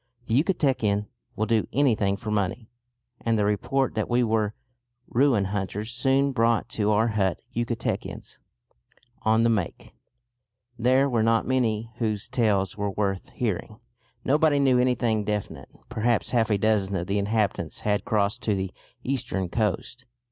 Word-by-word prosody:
The 115 - -3
Yucatecan 125 - +1 0.3
will 110 - 0
do 110 -1 +1
anything 110 -8 +2
for 110 0 -5
money, 105 +3 -2 0.5
and 115 -1 0
the 105 - +2
report 130 +6 0
that 110 - -2
we 125 0 +3
were 110 -2 0 0.5
ruin 120 -5 +3
hunters 100 +3 -3
soon 135 +3 +2
brought 115 -3 +2
to 105 -1 0
our 110 +2 +3
hut 100 -4 0 0.2
Yucatecans 120 0 -3 0.8
"on 110 +1 +3
the 115 - +4
make." 95 -7 -3 0.8
There 130 +3 +3
were 120 -4 +1
not 115 +1 +2
many 115 -3 0
whose 110 -4 -2
tales 100 -6 +1
were 105 -1 -2
worth 95 -1 -2
hearing. 110 -1 -3 0.5
Nobody 150 +1 +3
knew 135 -3 +4
anything 120 -4 +1
definite; 100 -9 -4 0.2
perhaps 115 +1 0
half 115 -3 +2
a 105 - +3
dozen 100 -2 +1
of 90 -2 -2
the 100 +2 0
inhabitants 100 -5 -1
had 105 -1 0
crossed 105 +1 0
to 110 -5 +1
the 95 -1 -3 0.3
eastern 120 -9 -2
coast. 110 +5 -2
110 Hz, 150 wpm, -26 LUFS, 100-120 Hz, 0.8 s, the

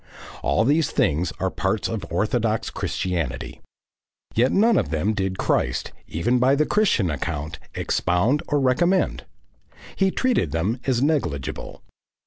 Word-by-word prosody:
All 110 - +2
these 150 +5 +2
things 90 - +1
are - - 0
parts - - -1
of - - -5
orthodox - - 0
Christianity. 80 -9 -3 0.7
Yet 125 +4 +3
none 225 +3 +4
of 75 - +1
them 80 +7 0
did 95 -2 -2
Christ, - - 0 0.2
even 120 +10 0
by 130 +3 +4
the 150 +2 +2
Christian 150 - +2
account, 75 +1 -4 0.2
expound 100 +12 +1
or 145 - +1
recommend. 175 +8 +1 0.7
He 195 -1 +2
treated 210 - 0
them 95 +10 0
as 130 -1 +2
negligible. 85 - -2
115 Hz, 130 wpm, -23 LUFS, -, 0.7 s, none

